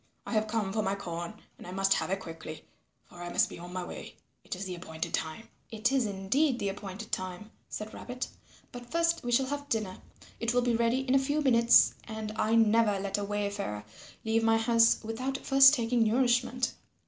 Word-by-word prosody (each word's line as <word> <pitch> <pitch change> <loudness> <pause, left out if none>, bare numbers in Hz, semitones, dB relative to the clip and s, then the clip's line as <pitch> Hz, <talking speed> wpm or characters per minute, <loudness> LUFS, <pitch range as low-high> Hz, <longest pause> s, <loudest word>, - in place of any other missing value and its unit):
I - - -5
have 215 0 +1
come 215 -3 -1
for 215 - +1
my 195 -1 0
corn 175 -1 -6 0.2
and - - -10
I - - -7
must 195 +1 +2
have - - -1
it 195 +1 -1
quickly, 165 -3 -9 0.4
for 175 - -13
I 175 - -5
must - - +2
be - - -9
on 175 +1 -9
my 185 0 -4
way. - - -8 0.3
It - - -5
is 190 +2 -6
the 185 - -4
appointed 160 -2 -6
time." 160 +8 -3 0.2
"It 225 +3 0
is 265 -5 +2
indeed 215 +8 +1
the 200 - -1
appointed 200 +2 -7
time," 185 +3 -4 0.2
said 215 +1 -6
Rabbit, 250 0 -5 0.4
"but 245 -1 -10
first 335 +2 +1
we 240 - -2
shall 260 +3 +3
have 285 +1 -5
dinner. 215 -6 -2 0.4
It 235 +1 -1
will 245 - +3
be 240 -1 +2
ready 235 +3 +2
in 265 -1 -1
a 270 - +6
few 285 +3 0
minutes 235 -4 +5
and 220 -1 -5
I 220 +1 +1
never 225 -2 +4
let 200 +1 -2
a - - -2
wayfarer 200 - -3 0.4
leave 225 +1 +2
my 225 0 +4
house 230 0 +4
without 255 +5 -3
first 270 +1 +6
taking 235 -1 0
nourishment. 245 +2 +1
220 Hz, 205 wpm, -30 LUFS, 195-245 Hz, 0.4 s, a